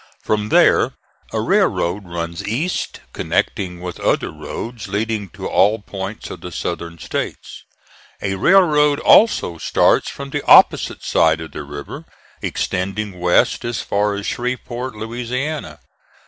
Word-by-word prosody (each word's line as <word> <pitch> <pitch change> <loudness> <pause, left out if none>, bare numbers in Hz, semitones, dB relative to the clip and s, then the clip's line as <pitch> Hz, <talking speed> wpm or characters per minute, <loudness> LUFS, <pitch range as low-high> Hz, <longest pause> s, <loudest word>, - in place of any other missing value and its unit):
From 105 0 0
there - - +4 0.4
a - - -1
railroad 95 +4 +1
runs 85 -1 -4
east, 145 - -2
connecting 90 -2 -1
with 90 -1 -6
other - - 0
roads 115 -3 -7
leading 105 0 -2
to - - -6
all 105 +3 +3
points 100 0 -7
of - - -8
the 90 - -7
Southern 85 +1 -4
States. - - -5 0.6
A 100 - -2
railroad 150 - +4
also 90 - +4
starts - - +2
from 140 0 -8
the 145 0 -2
opposite - - +5
side 80 0 +3
of 80 -1 -8
the 75 - -6
river, 70 0 -8 0.4
extending 95 +1 -3
west 90 0 +2
as 120 -1 -3
far 100 0 0
as 100 0 -5
Shreveport, 125 0 -3
Louisiana. 120 - -4
105 Hz, 135 wpm, -19 LUFS, 90-125 Hz, 0.6 s, opposite